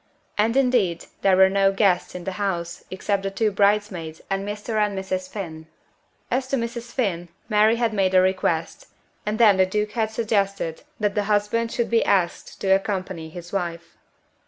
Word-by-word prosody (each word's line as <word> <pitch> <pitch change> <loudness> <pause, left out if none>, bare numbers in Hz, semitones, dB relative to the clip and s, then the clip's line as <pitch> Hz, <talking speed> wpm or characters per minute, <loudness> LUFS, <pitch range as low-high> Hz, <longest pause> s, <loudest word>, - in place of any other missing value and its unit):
And 225 +4 +2
indeed 240 -11 +2 0.2
there 190 -1 +4
were 190 0 +7
no 195 0 +3
guests 195 -3 +1
in 180 - -6
the 190 - -3
house 175 -4 -2
except 195 +1 -1
the 195 - -2
two 210 +2 0
bridesmaids 200 -5 +1
and 195 0 0
Mr. 210 +2 -3
and 205 -2 -2
Mrs. 185 -1 -3
Finn. 160 -6 -7 0.6
As 260 +1 0
to 275 - 0
Mrs. 235 0 -4
Finn, 180 -9 -1 0.2
Mary 215 +1 +4
had 235 -2 0
made 190 -2 +1
a - - +8
request, 185 -3 -1 0.4
and 210 +1 0
then 215 -4 +6
the 190 - +5
Duke 210 +2 -1
had 220 -1 0
suggested 200 -6 -1 0.2
that 205 -1 +1
the 205 0 0
husband 210 +3 +1
should 235 - -1
be 230 - +4
asked 180 -3 0
to 195 - -1
accompany 190 -4 -2
his 175 +2 -10
wife. 170 -3 -4
200 Hz, 180 wpm, -23 LUFS, 185-215 Hz, 0.6 s, a